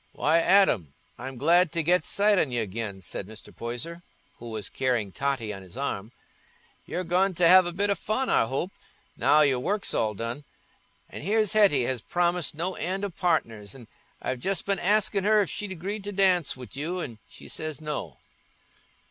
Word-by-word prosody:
"Why, 160 Hz, +3 st, +3 dB
Adam, 165 Hz, -, +3 dB, 0.2 s
I'm 130 Hz, +1 st, -7 dB
glad 170 Hz, +5 st, +4 dB
to 165 Hz, -2 st, 0 dB
get 180 Hz, +3 st, +3 dB
sight 205 Hz, -1 st, +3 dB
on 140 Hz, -, +1 dB
y' 120 Hz, -, -1 dB
again," 105 Hz, -2 st, -4 dB
said 90 Hz, -, -5 dB
Mr. 110 Hz, 0 st, -12 dB
Poyser, 125 Hz, +9 st, -5 dB, 0.4 s
who 120 Hz, -, -8 dB
was 110 Hz, -3 st, -4 dB
carrying 120 Hz, -6 st, -1 dB
Totty 130 Hz, -3 st, -2 dB
on 95 Hz, -, -8 dB
his 95 Hz, +4 st, -12 dB
arm. 115 Hz, -6 st, -3 dB, 0.8 s
"You're 180 Hz, -, -3 dB
going 185 Hz, +2 st, +1 dB
t' 180 Hz, -, -1 dB
have 185 Hz, +1 st, +7 dB
a -, -, -2 dB
bit 200 Hz, +3 st, 0 dB
o' -, -, +5 dB
fun, 215 Hz, +7 st, -2 dB
I -, -, +3 dB
hope, 140 Hz, +9 st, -2 dB, 0.4 s
now 155 Hz, -, +4 dB
your 135 Hz, -4 st, +3 dB
work's 200 Hz, +9 st, -2 dB
all 110 Hz, -1 st, 0 dB
done. 115 Hz, +7 st, -4 dB, 0.6 s
And -, -, -8 dB
here's 215 Hz, +1 st, +2 dB
Hetty 200 Hz, -12 st, +5 dB
has 125 Hz, -1 st, -1 dB
promised 175 Hz, -1 st, 0 dB
no 175 Hz, +4 st, -2 dB
end 190 Hz, +3 st, -1 dB
o' 200 Hz, -, -4 dB
partners, 115 Hz, -, -1 dB
an' 120 Hz, -4 st, -12 dB, 0.3 s
I've 130 Hz, -, -3 dB
just 190 Hz, +6 st, -1 dB
been 200 Hz, -2 st, 0 dB
askin' 205 Hz, +1 st, +2 dB
her 215 Hz, +1 st, +4 dB
if 195 Hz, -, -2 dB
she'd 205 Hz, -2 st, -4 dB
agreed 195 Hz, +4 st, -5 dB
to 205 Hz, -, -4 dB
dance 185 Hz, -8 st, +2 dB
wi' 125 Hz, -1 st, -9 dB
you, 160 Hz, +6 st, -3 dB
an' 115 Hz, -10 st, -6 dB
she -, -, -13 dB
says 155 Hz, -1 st, -4 dB
no." 150 Hz, -, -5 dB
160 Hz, 190 wpm, -27 LUFS, 120-190 Hz, 0.8 s, have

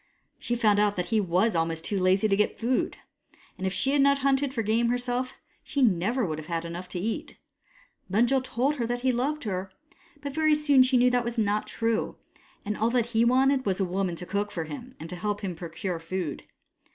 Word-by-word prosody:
She 240 Hz, -, -2 dB
found 215 Hz, -4 st, +3 dB
out 205 Hz, -1 st, +2 dB
that 180 Hz, -1 st, -3 dB
he 220 Hz, -, +4 dB
was 190 Hz, +3 st, +1 dB
almost 165 Hz, 0 st, 0 dB
too 200 Hz, -, -1 dB
lazy 185 Hz, +3 st, +3 dB
to 195 Hz, -, +2 dB
get 210 Hz, +1 st, +1 dB
food, 245 Hz, +3 st, 0 dB, 0.6 s
and 190 Hz, -, -3 dB
if -, -, -1 dB
she 270 Hz, -, +2 dB
had 285 Hz, 0 st, +3 dB
not 280 Hz, 0 st, +4 dB
hunted 275 Hz, 0 st, +2 dB
for 235 Hz, -4 st, -2 dB
game 230 Hz, +3 st, +2 dB
herself, 245 Hz, +1 st, -1 dB, 0.3 s
she 280 Hz, -2 st, -1 dB
would 235 Hz, -, +6 dB
never 215 Hz, +8 st, 0 dB
have 155 Hz, 0 st, -8 dB
had 170 Hz, -1 st, -2 dB
enough 175 Hz, +2 st, -6 dB
to 180 Hz, -, -4 dB
eat. 220 Hz, +5 st, -4 dB, 0.7 s
Bunjil 235 Hz, +6 st, +3 dB
had 260 Hz, -, -9 dB
told 265 Hz, +4 st, 0 dB
her 235 Hz, -3 st, -1 dB
that 245 Hz, +1 st, -2 dB
he 260 Hz, 0 st, +2 dB
loved 280 Hz, +5 st, -1 dB
her, 190 Hz, -3 st, -3 dB, 0.5 s
but 280 Hz, -1 st, -6 dB
very 310 Hz, 0 st, +3 dB
soon 290 Hz, -3 st, +5 dB
she 255 Hz, 0 st, +4 dB
knew 250 Hz, +1 st, +4 dB
that 245 Hz, -1 st, +2 dB
this 235 Hz, 0 st, -4 dB
was 220 Hz, -, +2 dB
not 205 Hz, +1 st, 0 dB
true, 230 Hz, -1 st, -1 dB, 0.5 s
and 210 Hz, -, -1 dB
that -, -, -11 dB
all 225 Hz, -, +3 dB
he 235 Hz, -1 st, 0 dB
had 235 Hz, +1 st, +5 dB
wanted 265 Hz, +1 st, +3 dB
was 195 Hz, -3 st, -1 dB
a 195 Hz, -, +2 dB
woman 185 Hz, -1 st, -1 dB
to 180 Hz, -, -7 dB
cook 205 Hz, +2 st, -2 dB
for 175 Hz, -5 st, -4 dB
him 235 Hz, -, -9 dB
and 165 Hz, +2 st, -7 dB
help 205 Hz, +3 st, -3 dB
him 190 Hz, -3 st, -3 dB
procure 170 Hz, +1 st, -5 dB
food. 165 Hz, -2 st, -4 dB
220 Hz, 230 wpm, -27 LUFS, 185-255 Hz, 0.7 s, would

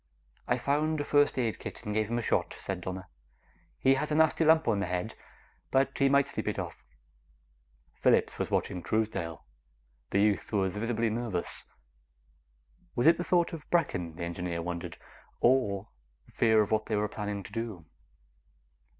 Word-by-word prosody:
"I -, -, +2 dB
found 150 Hz, +5 st, 0 dB
a -, -, 0 dB
first 145 Hz, -1 st, +3 dB
aid 115 Hz, -4 st, 0 dB
kit -, -, -8 dB
and 105 Hz, -, -2 dB
gave 110 Hz, 0 st, 0 dB
him 120 Hz, -, 0 dB
a 120 Hz, -, -1 dB
shot," -, -, 0 dB
said 95 Hz, -2 st, -4 dB
Donna. 95 Hz, +1 st, -5 dB, 0.7 s
"He 135 Hz, -, +4 dB
has 150 Hz, +3 st, -1 dB
a -, -, +2 dB
nasty 160 Hz, +1 st, +4 dB
lump 160 Hz, 0 st, +5 dB
on 105 Hz, -3 st, +2 dB
the 100 Hz, -, -1 dB
head, 90 Hz, +5 st, -2 dB, 0.6 s
but 135 Hz, +1 st, +2 dB
he 135 Hz, -1 st, +3 dB
might 140 Hz, 0 st, +4 dB
sleep -, -, -5 dB
it -, -, -1 dB
off." -, -, -6 dB, 1.1 s
Phillips -, -, +2 dB
was -, -, -1 dB
watching 90 Hz, -3 st, -1 dB
Truesdale. 85 Hz, -5 st, -2 dB, 0.6 s
The 100 Hz, -, +1 dB
youth 105 Hz, -2 st, +2 dB
was 95 Hz, -2 st, 0 dB
visibly 115 Hz, +1 st, 0 dB
nervous. 110 Hz, -6 st, -3 dB, 1.3 s
Was 120 Hz, -, +1 dB
it 165 Hz, +2 st, +6 dB
the -, -, 0 dB
thought 175 Hz, -1 st, +2 dB
of 155 Hz, -3 st, -8 dB
Brecken, 90 Hz, -, 0 dB
the 85 Hz, -, -5 dB
engineer 85 Hz, 0 st, -3 dB
wondered, 85 Hz, 0 st, -5 dB, 0.4 s
or 110 Hz, -5 st, +2 dB, 0.4 s
fear 110 Hz, -2 st, +4 dB
of 100 Hz, -, -6 dB
what 110 Hz, 0 st, +1 dB
they 110 Hz, -, 0 dB
were 105 Hz, 0 st, +1 dB
planning 105 Hz, -1 st, -4 dB
to -, -, -11 dB
do? 110 Hz, -8 st, -5 dB
110 Hz, 170 wpm, -30 LUFS, 95-135 Hz, 1.3 s, it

